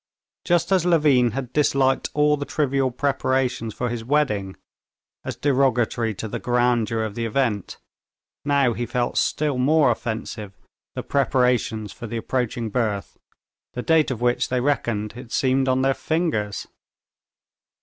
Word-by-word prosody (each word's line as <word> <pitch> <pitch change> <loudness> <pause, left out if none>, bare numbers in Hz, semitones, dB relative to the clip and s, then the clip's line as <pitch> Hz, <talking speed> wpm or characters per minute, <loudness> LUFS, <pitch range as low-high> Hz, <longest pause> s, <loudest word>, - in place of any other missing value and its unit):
Just 175 0 +1
as 185 -3 +4
Levin 150 -8 +4
had 130 -1 -5
disliked 135 -3 +2
all 150 0 +4
the 145 - -4
trivial 140 -3 0
preparations 130 -3 -1
for 125 - -3
his 120 -1 -4
wedding, 115 -8 0 0.7
as - - -5
derogatory 125 -5 +1
to 110 - -5
the - - -4
grandeur 120 -2 +1
of 110 -2 -4
the 115 +1 -2
event, 115 -4 -1 0.7
now 140 -4 +2
he 120 +1 -3
felt 120 -1 -1
still 145 -4 0
more 145 0 +4
offensive 110 -3 -5 0.4
the - - -4
preparations 125 -6 +1
for 120 - -8
the 115 - -4
approaching 120 -1 -2
birth, 105 -4 -2 0.5
the 125 - -4
date 160 -2 +3
of 125 -3 -4
which 120 0 +1
they 125 - 0
reckoned, 120 -6 -1
it 125 -1 -10
seemed, 135 0 +1
on 130 0 +2
their 135 0 +3
fingers. 155 - -2
125 Hz, 145 wpm, -23 LUFS, 115-140 Hz, 0.7 s, as